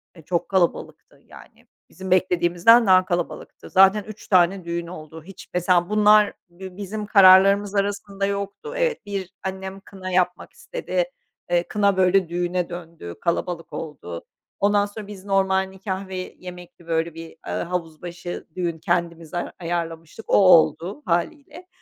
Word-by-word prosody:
E, 165 Hz, -, -13 dB
çok 170 Hz, +2 st, -2 dB
kalabalıktı 185 Hz, -3 st, -2 dB
yani. -, -, -17 dB, 0.2 s
Bizim 190 Hz, -1 st, -8 dB
beklediğimizden 185 Hz, +5 st, +4 dB
daha 185 Hz, -1 st, +6 dB
kalabalıktı. 175 Hz, -2 st, -4 dB
Zaten 195 Hz, +2 st, +5 dB
3 215 Hz, +1 st, -11 dB
tane 185 Hz, 0 st, +3 dB
düğün 170 Hz, 0 st, -3 dB
oldu. 160 Hz, -2 st, -10 dB
Hiç 195 Hz, +3 st, -13 dB
mesela 180 Hz, 0 st, +2 dB
bunlar 210 Hz, 0 st, +5 dB, 0.2 s
bi 185 Hz, +1 st, -11 dB
bizim 210 Hz, +1 st, -5 dB
kararlarımız 195 Hz, 0 st, +6 dB
arasında 200 Hz, 0 st, -1 dB
yoktu. 200 Hz, -, -4 dB
Evet, 485 Hz, -, -1 dB
1 195 Hz, -2 st, -5 dB
annem 190 Hz, 0 st, -5 dB
kına 190 Hz, -1 st, -9 dB
yapmak 180 Hz, -1 st, 0 dB
istedi. -, -, -3 dB, 0.5 s
Eee, 175 Hz, 0 st, +3 dB
kına, 200 Hz, -2 st, +1 dB
böyle, 185 Hz, -1 st, +3 dB
düğüne 175 Hz, 0 st, -2 dB
döndü, 165 Hz, -, -8 dB
kalabalık 170 Hz, 0 st, -2 dB
oldu. 110 Hz, -, -7 dB, 0.3 s
Ondan 205 Hz, 0 st, +3 dB
sonra 205 Hz, 0 st, -9 dB
biz 200 Hz, -2 st, -10 dB
normal 190 Hz, -1 st, +2 dB
nikâh 190 Hz, 0 st, -5 dB
ve 190 Hz, -, -7 dB, 0.2 s
yemekli, 180 Hz, -1 st, -12 dB
böyle, 165 Hz, 0 st, -1 dB
bir, 165 Hz, 0 st, -9 dB, 0.2 s
eee, -, -, -4 dB
havuz 170 Hz, -3 st, -5 dB
başı 175 Hz, 0 st, -7 dB
düğün 170 Hz, -3 st, -2 dB
kendimize 170 Hz, 0 st, -2 dB
ay 175 Hz, -, -3 dB
ayarlamıştık. 165 Hz, +2 st, -5 dB
O -, -, -1 dB
oldu 185 Hz, -, +4 dB
hâliyle. 285 Hz, -, -3 dB
185 Hz, 145 wpm, -23 LUFS, 170-200 Hz, 0.5 s, daha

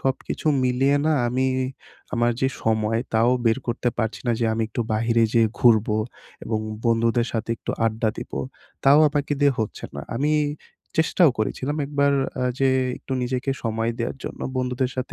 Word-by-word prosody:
সবকিছু 135 Hz, +3 st, -3 dB, 0.2 s
মিলিয়ে 135 Hz, +3 st, +2 dB
না 160 Hz, -, +3 dB, 0.2 s
আমি, 130 Hz, +2 st, +1 dB, 0.7 s
আমার 120 Hz, 0 st, +2 dB
যে 130 Hz, -, +3 dB
সময় 110 Hz, 0 st, +1 dB
তাও 115 Hz, +2 st, +4 dB, 0.2 s
বের 115 Hz, +3 st, +3 dB
করতে 120 Hz, +1 st, 0 dB
পারছি 110 Hz, -1 st, -1 dB
না 120 Hz, -, +3 dB
যে -, -, +2 dB
আমি 115 Hz, 0 st, 0 dB
একটু 115 Hz, -, -4 dB
বাহিরে 115 Hz, +1 st, +2 dB
যেয়ে 115 Hz, -2 st, +4 dB
ঘুরবো 110 Hz, -3 st, +4 dB, 0.5 s
এবং 110 Hz, -1 st, -1 dB, 0.3 s
বন্ধুদের 115 Hz, +1 st, +2 dB
সাথে 115 Hz, 0 st, -2 dB
একটু -, -, -5 dB, 0.2 s
আড্ডা 110 Hz, 0 st, 0 dB
দিবো। -, -, -5 dB, 0.5 s
তাও 140 Hz, +2 st, +7 dB
আমাকে 145 Hz, 0 st, -1 dB
দিয়ে 140 Hz, -1 st, +5 dB
হচ্ছে 110 Hz, -, -3 dB
না 70 Hz, -, -5 dB, 0.2 s
আমি 150 Hz, +4 st, +1 dB, 0.7 s
চেষ্টাও 160 Hz, -1 st, +4 dB
করেছিলাম 130 Hz, +7 st, -2 dB
একবার 140 Hz, 0 st, +2 dB, 0.3 s
আ -, -, +1 dB
যে 135 Hz, 0 st, +3 dB, 0.3 s
একটু 135 Hz, -, -7 dB
নিজেকে 125 Hz, +2 st, -1 dB
সময় 115 Hz, 0 st, -1 dB
দেওয়ার 115 Hz, +3 st, -2 dB
জন্য, -, -, -6 dB, 0.2 s
বন্ধুদের 125 Hz, 0 st, -1 dB
সাথে 130 Hz, -, -4 dB
120 Hz, 165 wpm, -23 LUFS, 115-135 Hz, 0.7 s, তাও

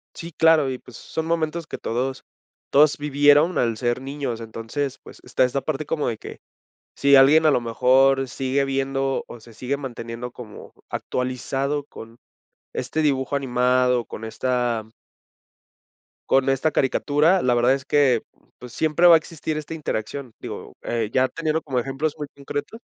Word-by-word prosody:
sí 170 Hz, +1 st, -8 dB
claro, 160 Hz, -3 st, +4 dB
y 130 Hz, -, -3 dB
pues, 125 Hz, -, -15 dB
son 160 Hz, -, -5 dB
momentos 165 Hz, 0 st, -1 dB
que -, -, -6 dB
todos 130 Hz, +3 st, -3 dB, 0.5 s
todos 150 Hz, +1 st, +5 dB
vivieron 145 Hz, +3 st, +4 dB
al 115 Hz, -2 st, 0 dB
ser 120 Hz, +2 st, -1 dB
niños, 135 Hz, -4 st, -4 dB
entonces, 115 Hz, +5 st, -4 dB
pues, -, -, -13 dB
está -, -, +1 dB
esa 130 Hz, +2 st, 0 dB
parte 155 Hz, -1 st, -3 dB
como 150 Hz, 0 st, -1 dB
de 115 Hz, -2 st, -2 dB
que -, -, -10 dB, 0.6 s
si 140 Hz, 0 st, +5 dB
alguien 145 Hz, +4 st, +6 dB
a -, -, +6 dB
lo 130 Hz, -, +2 dB
mejor 130 Hz, +3 st, +3 dB
sigue 135 Hz, +2 st, -1 dB
viendo 135 Hz, 0 st, -1 dB
o 120 Hz, -, -11 dB
se 115 Hz, +1 st, -15 dB
sigue 130 Hz, +5 st, -2 dB
manteniendo 120 Hz, -3 st, -6 dB
como 115 Hz, -4 st, -11 dB, 0.2 s
actualizado 135 Hz, +3 st, -2 dB
con 115 Hz, -4 st, -12 dB, 0.6 s
este 145 Hz, +5 st, -2 dB
dibujo 135 Hz, -2 st, 0 dB
animado, 125 Hz, -1 st, +2 dB
con 110 Hz, -, -8 dB
esta 120 Hz, -1 st, -1 dB, 1.5 s
con 135 Hz, 0 st, +3 dB
esta 135 Hz, +4 st, +1 dB
caricatura, 150 Hz, +7 st, +2 dB
la 125 Hz, -, +2 dB
verdad 120 Hz, +2 st, +4 dB
es 135 Hz, 0 st, -3 dB
que, 135 Hz, -4 st, +3 dB, 0.4 s
pues, 125 Hz, -1 st, -11 dB
siempre 160 Hz, +5 st, +3 dB
va 170 Hz, -, +9 dB
a -, -, +8 dB
existir 160 Hz, -1 st, -5 dB
esta 155 Hz, +1 st, -6 dB
interacción, 135 Hz, -4 st, -4 dB
digo, -, -, -8 dB
eh, 115 Hz, -3 st, -2 dB
ya 130 Hz, 0 st, +3 dB
teniendo 160 Hz, +2 st, -2 dB
como 130 Hz, -4 st, -2 dB
ejemplos 135 Hz, +5 st, -2 dB
muy 150 Hz, -1 st, -5 dB
concretos. 145 Hz, +9 st, -6 dB
135 Hz, 160 wpm, -23 LUFS, 125-150 Hz, 1.5 s, va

